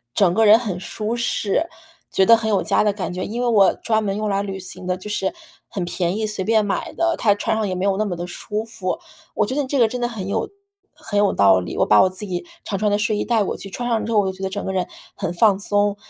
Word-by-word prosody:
整 185 Hz, -4 st, +4 dB
个 220 Hz, +3 st, +3 dB
人 215 Hz, +2 st, +8 dB
很 200 Hz, -7 st, -4 dB
舒 220 Hz, +4 st, -3 dB
适， 235 Hz, +6 st, 0 dB, 0.4 s
觉 190 Hz, -, +3 dB
得 230 Hz, +3 st, +7 dB
很 220 Hz, -1 st, -2 dB
有 200 Hz, -, +2 dB
家 -, -, +2 dB
的 210 Hz, -1 st, +2 dB
感 185 Hz, -4 st, -4 dB
觉。 180 Hz, +1 st, -3 dB
因 235 Hz, +4 st, -4 dB
为 245 Hz, -, +1 dB
我 205 Hz, -5 st, +5 dB
专 220 Hz, -1 st, 0 dB
门 200 Hz, -1 st, -2 dB
用 215 Hz, 0 st, -2 dB
来 195 Hz, 0 st, +1 dB
旅 195 Hz, -1 st, -4 dB
行 185 Hz, 0 st, -8 dB
的 180 Hz, -, +1 dB
就 185 Hz, +3 st, -9 dB
是 190 Hz, -2 st, -1 dB, 0.3 s
很 190 Hz, -, -4 dB
便 175 Hz, +2 st, -1 dB
宜， 220 Hz, -, -1 dB
随 210 Hz, -3 st, -3 dB
便 220 Hz, -1 st, +3 dB
买 195 Hz, -, -2 dB
的， 335 Hz, 0 st, +1 dB
它 205 Hz, -3 st, +3 dB
穿 220 Hz, +2 st, -1 dB
上 215 Hz, -2 st, 0 dB
也 185 Hz, -, -2 dB
没 185 Hz, -, -3 dB
有 195 Hz, -1 st, +1 dB
那 215 Hz, -, +1 dB
么 180 Hz, -3 st, -3 dB
地 175 Hz, -, -5 dB
舒 210 Hz, +4 st, -4 dB
服。 210 Hz, -5 st, -4 dB, 0.4 s
我 -, -, +2 dB
觉 255 Hz, -, -3 dB
得 290 Hz, -, +1 dB
你 260 Hz, -, -6 dB
这 280 Hz, -, -1 dB
个 230 Hz, -3 st, +4 dB
真 250 Hz, -, -4 dB
的 240 Hz, -, 0 dB
很 210 Hz, -5 st, -6 dB
有 200 Hz, -, -1 dB, 0.5 s
很 205 Hz, -2 st, -2 dB
有 205 Hz, -1 st, +3 dB
道 95 Hz, -2 st, +5 dB
理， 90 Hz, -, -6 dB
我 -, -, +3 dB
把 105 Hz, -1 st, +6 dB
我 185 Hz, -, +4 dB
自 185 Hz, +3 st, -5 dB
己 180 Hz, -3 st, -3 dB, 0.2 s
常 195 Hz, -, -3 dB
穿 210 Hz, 0 st, +2 dB
的 205 Hz, -, +2 dB
睡 210 Hz, 0 st, 0 dB
衣 -, -, -1 dB
带 225 Hz, -3 st, +2 dB
过 -, -, -3 dB
去， 195 Hz, -, -8 dB
穿 240 Hz, +5 st, -4 dB
上 230 Hz, -2 st, 0 dB
之 230 Hz, -, -4 dB
后 215 Hz, -, +4 dB
我 205 Hz, -, +2 dB
就 190 Hz, -, 0 dB
觉 190 Hz, -, -13 dB
得 190 Hz, -, -1 dB
整 200 Hz, +1 st, -4 dB
个 190 Hz, -, -2 dB
人 185 Hz, -2 st, -1 dB, 0.3 s
很 170 Hz, -, -3 dB
放 195 Hz, +1 st, +4 dB
松， 205 Hz, 0 st, +1 dB
205 Hz, 315 characters per minute, -21 LUFS, 190-220 Hz, 0.5 s, 人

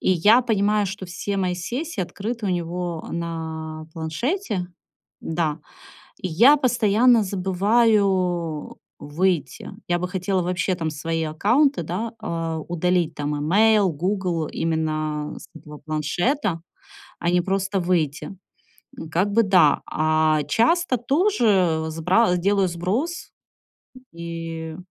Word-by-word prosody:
И -, -, +1 dB
я 210 Hz, +8 st, +5 dB
понимаю, 210 Hz, -3 st, +1 dB
что 195 Hz, 0 st, -6 dB
все 190 Hz, +3 st, -4 dB
мои 185 Hz, -2 st, 0 dB
сессии 245 Hz, -, -4 dB
открыты 205 Hz, +5 st, -4 dB
у -, -, 0 dB
него 175 Hz, -1 st, -3 dB
на 160 Hz, -2 st, -5 dB
планшете. 190 Hz, -, -2 dB, 0.5 s
Да. 160 Hz, -2 st, -2 dB, 0.6 s
И 185 Hz, -, -3 dB
я 240 Hz, -, +6 dB
постоянно 240 Hz, -3 st, +3 dB
забываю 190 Hz, -4 st, +1 dB, 0.2 s
выйти. 155 Hz, -2 st, -2 dB, 0.2 s
Я 175 Hz, 0 st, +1 dB
бы 180 Hz, -, -2 dB
хотела 185 Hz, +1 st, -1 dB
вообще 180 Hz, +1 st, -1 dB
там 165 Hz, -3 st, -3 dB
свои 165 Hz, +2 st, -3 dB
аккаунты, 235 Hz, -, +2 dB
да, 195 Hz, +8 st, -4 dB
э, 165 Hz, -1 st, -3 dB
удалить- 175 Hz, -1 st, 0 dB
там 145 Hz, 0 st, -3 dB
имейл, 200 Hz, +6 st, +3 dB
"Гугл"- 175 Hz, 0 st, -1 dB
именно 155 Hz, -2 st, -2 dB
с -, -, -13 dB
этого 150 Hz, -1 st, -12 dB
планшета, 165 Hz, -, -1 dB, 0.6 s
а 170 Hz, -, 0 dB
не 175 Hz, 0 st, +3 dB
просто 195 Hz, +2 st, -1 dB
выйти. 170 Hz, -1 st, -1 dB, 0.8 s
Как 190 Hz, +4 st, +1 dB
бы 230 Hz, +3 st, +4 dB
да. 180 Hz, -7 st, +4 dB
А 155 Hz, -1 st, +2 dB
часто 255 Hz, -, +2 dB
тоже 225 Hz, -, +2 dB
сбра 180 Hz, +5 st, +2 dB
делаю 195 Hz, +2 st, +2 dB
сброс. 205 Hz, -, -3 dB, 0.8 s
И, 165 Hz, -1 st, -6 dB
180 Hz, 120 wpm, -23 LUFS, 160-205 Hz, 0.8 s, я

